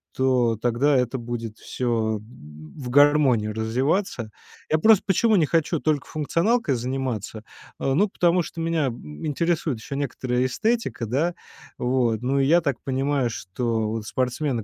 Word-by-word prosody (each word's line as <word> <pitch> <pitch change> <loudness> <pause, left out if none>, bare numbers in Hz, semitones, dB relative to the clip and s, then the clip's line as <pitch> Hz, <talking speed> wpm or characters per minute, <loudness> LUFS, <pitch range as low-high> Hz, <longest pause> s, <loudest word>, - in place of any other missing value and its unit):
То 125 -3 +2
тогда 120 +6 +1
это 125 0 +1
будет 115 -2 -5
всё, 115 -3 -1
м, 75 -8 -14
в 130 -4 -6
гармонии 145 -5 +4
развиваться. 115 - -1 0.4
Я 155 - +4
просто 215 +3 +5
почему 215 +3 +3
не 170 -5 +4
хочу 165 +1 0
только 150 -3 0
функционалкой 165 - 0
заниматься, 120 -4 -3 0.4
а, 135 - 0
ну, 200 +7 +3
потому 175 -2 +2
что 165 0 -6
меня, 165 -2 0
м, 75 - -6
интересует 155 -3 -1
еще 135 +5 -6
некоторая 130 -3 -1
эстетика, 220 - -1
да? 145 +10 0 0.4
Вот, 125 -3 0
ну, 135 +3 0
и 135 - +3
я 170 +5 +4
так 140 -7 -1
понимаю, 135 -1 0
что, 110 +2 -2
вот, 110 -1 -4
спортсмены, 125 +1 -1
130 Hz, 150 wpm, -24 LUFS, 115-155 Hz, 0.4 s, просто